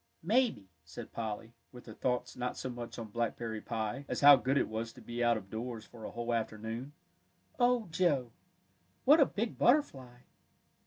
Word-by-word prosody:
"Maybe," 215 - +2 0.2
said 80 0 -10
Polly, 110 0 -5 0.2
with 125 -1 -12
her 110 - -9
thoughts 125 +2 -2
not 125 0 -3
so 130 - -4
much 120 -1 -7
on 115 -2 -6
blackberry 115 0 -3
pie, 110 +3 -3
as - - -3
how 145 0 +10
good 135 +1 0
it - - +2
was 110 +1 -4
to - - -14
be 120 +1 -4
out 120 -1 +4
of 95 -2 -10
doors 115 0 -5
for 115 -2 -11
a - - -4
whole 120 0 -3
afternoon. 115 +4 -3 0.7
"Oh, 245 -2 +3
Joe, 145 -9 +1 0.7
what 295 +5 +7
a 280 - +6
big 225 +3 -3
butterfly!" 135 - +2
120 Hz, 175 wpm, -32 LUFS, 110-140 Hz, 0.7 s, how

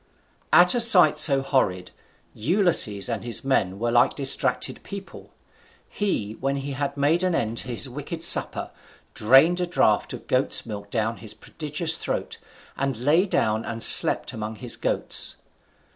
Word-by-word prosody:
At 180 0 +5
a 245 - -1
sight 180 -10 +5
so 140 -3 +6
horrid, 95 -10 -2 0.4
Ulysses 150 - +1
and 115 -4 -5
his 120 +2 -2
men 95 -8 -1
were 120 +3 -3
like 120 0 +1
distracted 135 -2 0
people. 200 -1 -12 0.5
He, 185 - -4
when 135 +1 -3
he 140 +1 -6
had 140 +1 -5
made 150 +5 0
an 185 -2 -1
end 115 -3 -3
of - - -5
his 125 +2 -1
wicked 145 +5 -9
supper, - - +2 0.4
drained 135 +11 +2
a 180 - -3
draught 175 - -1
of - - -11
goat's - - 0
milk 100 -2 -9
down 115 +1 -3
his 110 -2 -6
prodigious 160 +1 -4
throat, - - -6 0.4
and 135 -3 -4
lay 155 - 0
down 110 - -2
and 115 0 -4
slept - - +6
among 110 0 -7
his 120 +3 -2
goats. - - -1
135 Hz, 160 wpm, -22 LUFS, 115-160 Hz, 0.5 s, so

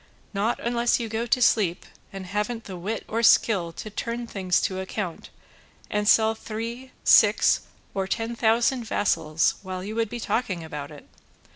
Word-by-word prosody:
Not 210 +4 0
unless 235 +1 +1
you 235 - -3
go 225 +2 -3
to 250 +2 +2
sleep 195 -6 +2 0.3
and 195 -1 -7
haven't 210 +4 -2
the 190 - -8
wit 200 +6 -4
or 225 +1 -1
skill 210 -6 +4
to 215 - -8
turn 235 +3 -4
things 190 -5 0
to 190 -1 -2
account 190 -2 -5 0.6
and 210 0 0
sell 220 0 +5
three, 230 +4 -6
six, - - +5 0.3
or 190 -1 -2
ten 225 +3 -2
thousand 235 +2 +2
vassals 165 -7 +1
while 185 -1 -6
you 210 +3 -5
would 225 -1 -1
be 240 +2 -5
talking 200 -8 -2
about 150 -3 -6
it! 150 -2 -13
215 Hz, 165 wpm, -25 LUFS, 185-230 Hz, 0.6 s, sell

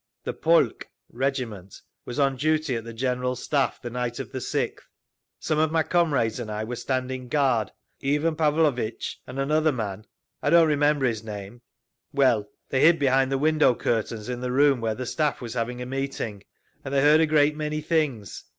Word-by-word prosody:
"The - - -3
polk - - +2 0.2
(regiment) 120 -8 -3 0.3
was 120 - -6
on 140 -2 +2
duty 155 -1 0
at 115 - -3
the 115 - -7
General 125 +1 -1
Staff 140 +1 -1
the 120 - -5
night 120 -1 -3
of 135 - -6
the 130 - -4
6th. - - -2 0.6
Some 155 - -1
of 155 0 +2
my 160 -1 +2
comrades 145 -11 +1
and 115 -3 -5
I 105 0 -3
were 120 +3 -4
standing 130 0 -3
guard; 125 -6 +1 0.3
Ivan 150 +4 +1
Pavlovitch 150 -7 0
and 125 - -8
another 155 +3 +2
man—I 110 +3 -6
don't 165 0 +6
remember 145 -2 +2
his 115 -3 -1
name—well, 110 +3 -3 0.2
they 130 - +1
hid 165 +1 +6
behind 135 -2 +2
the 135 - +1
window 155 -3 +3
curtains 110 -1 -2
in 125 -1 -4
the 125 0 -2
room 140 -1 +3
where 110 -1 -1
the 125 - -5
Staff 150 +4 -1
was 120 -2 -6
having 125 +1 -3
a - - -6
meeting, 125 -6 -4 0.4
and 135 - -6
they 140 -1 +2
heard 150 +2 +6
a 160 - +3
great 150 -1 +3
many 155 0 -2
things. 150 - -2
130 Hz, 180 wpm, -25 LUFS, 120-150 Hz, 0.6 s, don't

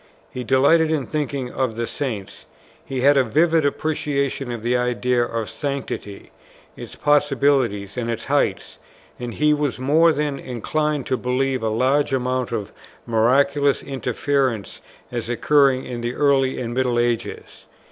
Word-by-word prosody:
He 125 - -5
delighted 140 +6 +4
in 150 -5 0
thinking 140 -4 -3
of 130 -4 -1
the 115 +1 -2
Saints; 110 -6 -5 0.4
he 130 -2 -4
had 140 +2 +5
a 135 - +5
vivid 160 +5 +2
appreciation 140 -3 -2
of 115 -2 -6
the 120 +1 +1
idea 125 0 +1
of 115 -2 -3
sanctity, 140 -8 -5 0.4
its - - -9
possibility 140 -7 +2
and 120 -2 -3
its 115 - -3
heights; - - -1 0.4
and 120 -1 -5
he 150 0 +3
was 145 -3 -1
more 155 +6 +4
than 145 -2 -2
inclined 150 +4 -2
to 130 - 0
believe 130 +1 -1
a 110 - 0
large 135 +6 +1
amount 125 -1 -1
of 105 -4 -4 0.3
miraculous 140 +5 +2
interference 130 -3 -2 0.3
as 120 -1 -4
occurring 135 +1 +3
in 120 -2 -5
the 120 +1 -3
early 135 -2 +2
and 120 -1 -4
middle 125 -1 0
ages. 120 -1 -2
130 Hz, 145 wpm, -22 LUFS, 120-145 Hz, 0.4 s, had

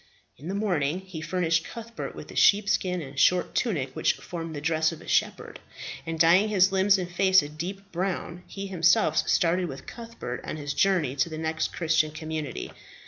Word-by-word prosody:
In 145 - -11
the 190 - -3
morning 180 -6 0
he 185 -4 -8
furnished 165 -1 0
Cuthbert 230 +3 -7
with - - -10
the - - -10
sheepskin 195 -4 +3
and 135 0 -7
short 180 -1 +3
tunic 145 - -1
which - - +2
formed 165 -2 -7
the - - -4
dress 155 +1 +1
of 165 - -9
a - - -14
shepherd, - - -1 0.5
and 165 0 -4
dyeing 175 +6 +5
his 190 -2 +4
limbs 195 +1 +4
and 180 -2 -3
face 190 0 +4
a 145 - -6
deep 190 +6 -7
brown, 180 -1 -3
he 200 0 -6
himself 170 -4 +3
started 175 +1 +2
with 135 -3 -8
Cuthbert 230 - -7
on - - -5
his 145 -1 -4
journey 175 -9 +2
to 140 +5 +1
the 160 - -6
next 160 0 -2
Christian 160 -2 +1
community. 155 -3 -5
170 Hz, 190 wpm, -26 LUFS, 155-190 Hz, 0.5 s, dyeing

